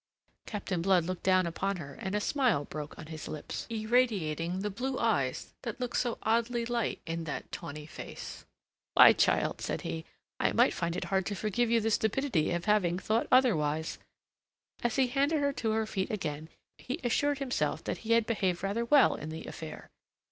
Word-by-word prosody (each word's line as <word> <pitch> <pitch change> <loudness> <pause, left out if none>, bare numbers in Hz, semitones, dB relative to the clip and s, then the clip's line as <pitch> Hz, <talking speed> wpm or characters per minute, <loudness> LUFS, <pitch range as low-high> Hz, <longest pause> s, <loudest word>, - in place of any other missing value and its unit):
Captain 190 -4 -3
Blood 180 -2 +3
looked 185 +1 -3
down 185 -1 +4
upon 195 +4 -1
her, 140 -5 -7
and 190 +7 -4
a - - +2
smile 235 - +1
broke 150 0 -7
on 160 - -8
his 155 0 -7
lips, 150 - -5
irradiating 210 -7 +1
the 210 +1 -2
blue 255 +6 -3
eyes 140 - 0
that 235 -2 -5
looked 250 -1 -3
so 240 -2 0
oddly 235 +1 +1
light 235 -1 -1
in 165 0 -3
that 150 - -5
tawny 150 +1 -6
face. 155 - -8 0.5
"Why, - - +10
child," - - +2
said - - -2
he, 80 0 -4 0.4
"I - - +2
might - - +4
find 170 0 -2
it - - -2
hard 190 -2 0
to 205 - -2
forgive 215 +5 0
you 230 0 +4
the 225 +1 0
stupidity 220 - +1
of 175 0 -2
having 200 -5 +3
thought 220 +4 0
otherwise." 160 - +3 0.8
As 240 -2 +1
he 265 - +4
handed 280 +5 +1
her 285 -1 +1
to 225 - -2
her 220 0 +1
feet 195 -3 -2
again, 160 -6 -4 0.3
he 260 +6 -4
assured 285 +4 +1
himself 270 -2 -1
that - - -3
he 230 0 0
had 230 -1 +4
behaved 190 -6 0
rather 205 +4 0
well 285 +4 +6
in 155 - -6
the 160 0 -6
affair. 160 -1 -8
210 Hz, 190 wpm, -30 LUFS, 165-235 Hz, 0.8 s, Why